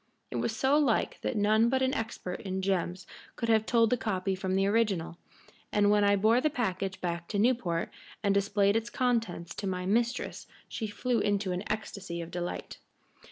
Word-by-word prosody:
It - - -3
was 220 - -1
so 270 +5 +3
like 260 -7 +1
that - - -2
none 215 +3 +4
but 260 +1 +1
an 260 +1 +1
expert 225 -7 -4
in 190 -1 -3
gems 185 -2 -1 0.3
could 230 - -3
have 220 -1 +3
told 230 -2 +3
the 250 - +3
copy 195 -4 -1
from 190 0 -2
the 195 0 +3
original, 200 -6 0 0.5
and 205 -1 +3
when 210 0 +4
I 200 0 +5
bore 220 +5 +4
the 305 - +2
package 195 -8 -2
back 170 -1 -3
to 205 - -3
Newport 205 -7 +1 0.3
and 200 -1 +3
displayed 200 0 +2
its 225 +1 0
contents 225 -9 -1
to 200 - -4
my 180 -1 -2
mistress 235 +6 -1 0.2
she 220 - -4
flew 230 +3 -1
into 205 -2 0
an 180 +3 -3
ecstasy 200 -5 -4
of 170 0 -6
delight. 175 0 -5
205 Hz, 190 wpm, -30 LUFS, 185-230 Hz, 0.5 s, I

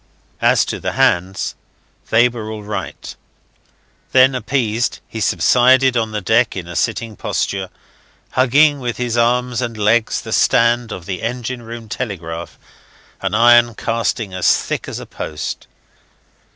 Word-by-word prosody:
As - - +4
to - - -4
the - - -3
hands, 90 +2 +1 0.6
they 115 +2 +5
were 115 -3 -6
all 110 -1 -6
right. 105 0 -6 1.0
Then, 130 +1 +6
appeased, 120 -2 -1
he 110 - -7
subsided 130 +5 +4
on 115 -2 0
the 105 -1 -4
deck 110 +5 +2
in 90 -3 -6
a 85 - -8
sitting 115 +4 -2
posture, 95 -2 -2 0.6
hugging 145 +3 +4
with 120 -3 -4
his 120 -1 -2
arms 120 +1 +1
and 115 -2 -4
legs 110 +2 +2
the - - -6
stand 120 0 +3
of 90 -4 -7
the 95 -3 -5
engine 120 +1 -4
room 115 0 -9
telegraph 85 -8 -6 0.6
an 95 +1 -1
iron 120 0 +5
casting 115 -3 -2
as 95 -1 +3
thick - - -4
as - - -5
a - - -8
post. 75 -2 -6
115 Hz, 145 wpm, -18 LUFS, 105-125 Hz, 1.0 s, Then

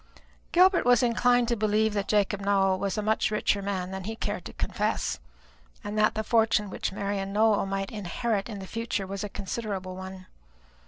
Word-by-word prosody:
Gilbert 365 +1 +5
was 245 +1 +4
inclined 245 0 +3
to 235 - +1
believe 215 0 +1
that 200 -1 -1
Jacob 205 -1 +1
Nowell 195 -1 +2
was 195 0 -2
a 210 - -1
much 220 +1 +1
richer 210 -1 +1
man 190 -2 -3
than 190 -1 -5
he 220 +2 -4
cared - - -4
to - - -8
confess, - - -1 0.6
and 205 0 -5
that 215 +1 +3
the 220 - -1
fortune 220 -3 +2
which - - -3
Marian 195 0 -3
Nowell 210 -1 +3
might 195 0 -3
inherit 210 +1 -2
in 210 - -5
the 195 - -7
future 225 -1 -3
was 195 +2 -5
a 205 - -4
considerable 195 -2 -4
one. 190 0 -8
205 Hz, 190 wpm, -27 LUFS, 195-220 Hz, 0.6 s, Gilbert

